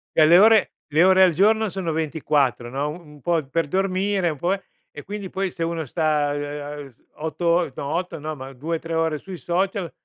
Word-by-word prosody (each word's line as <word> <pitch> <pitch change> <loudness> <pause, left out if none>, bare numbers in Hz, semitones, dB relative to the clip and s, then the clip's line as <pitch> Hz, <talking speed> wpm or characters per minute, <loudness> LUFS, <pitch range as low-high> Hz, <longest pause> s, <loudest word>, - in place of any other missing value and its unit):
Cioè 155 - +6
le 170 +3 +7
ore 220 +1 +5 0.2
le 155 +3 +4
ore 190 0 +5
al 185 -2 +6
giorno 215 +5 +3
sono 185 -3 -3
24, 145 -6 0
no, 140 +3 -2
u - - -4
un 150 -4 -16
po' 165 0 0
per 165 +3 -1
dormire, 190 +1 0
un 155 - -4
po', 175 +5 +1
eh 195 -1 -5 0.3
e 150 - -10
quindi 200 -1 -6
poi 190 0 -2
se - - -10
uno 165 -1 -2
sta 150 0 0 0.8
8 160 +2 -4
or 170 -3 +2
no - - -5
8 180 +1 -2
no, 155 +1 -5
ma 135 -1 -9
2,3 165 +4 -4
ore 160 -2 0
sui 190 +2 -8
social, 180 +3 -1
165 Hz, 205 wpm, -23 LUFS, 150-185 Hz, 0.8 s, le